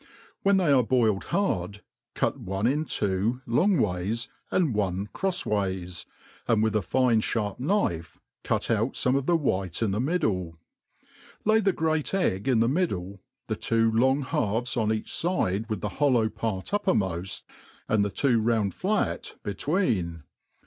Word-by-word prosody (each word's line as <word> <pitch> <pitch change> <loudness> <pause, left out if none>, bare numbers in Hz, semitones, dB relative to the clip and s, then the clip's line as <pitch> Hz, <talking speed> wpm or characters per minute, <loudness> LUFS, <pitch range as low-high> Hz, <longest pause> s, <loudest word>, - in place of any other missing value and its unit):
When 200 0 +4
they 175 -6 +3
are 135 -2 +6
boiled 115 -5 +1
hard, 100 - -1 0.3
cut - - 0
one 95 -2 -3
in 145 +6 +1
two 105 +3 -1
long 175 - +3
ways, 105 +1 -1 0.2
and 165 -9 +1
one 100 -1 -1
crofs 190 -1 -1
ways, 95 -4 -2 0.4
and 110 -2 +3
with 110 -1 +1
a 105 - +3
fine 120 +4 +2
fharp 105 -2 -2
knife 125 - -1 0.2
cut - - 0
out - - +1
fome 130 +1 +1
of 140 -1 -1
the 175 - +4
white 95 - -1
in 105 - +1
the 105 +4 0
middle; 105 - -1 0.9
lay 220 +1 +5
the 200 -2 +2
great 160 0 0
egg 105 - 0
in 120 -4 +3
the 115 - +3
middle, 100 - -1 0.2
the - - -2
two 115 0 +1
long 130 +5 +3
halves 120 0 -1
on 110 -3 +1
each 110 -1 -3
fide 115 - 0
wi^ 110 -3 -3
the 105 - -2
hollow 125 -6 +4
part 110 -4 -4
uppermoft, 95 - 0 0.4
and 105 -1 +2
the 100 - 0
two 115 +3 +2
round 110 -3 +1
flat 205 +2 -1
between. 100 - -1
115 Hz, 160 wpm, -27 LUFS, 100-145 Hz, 0.9 s, are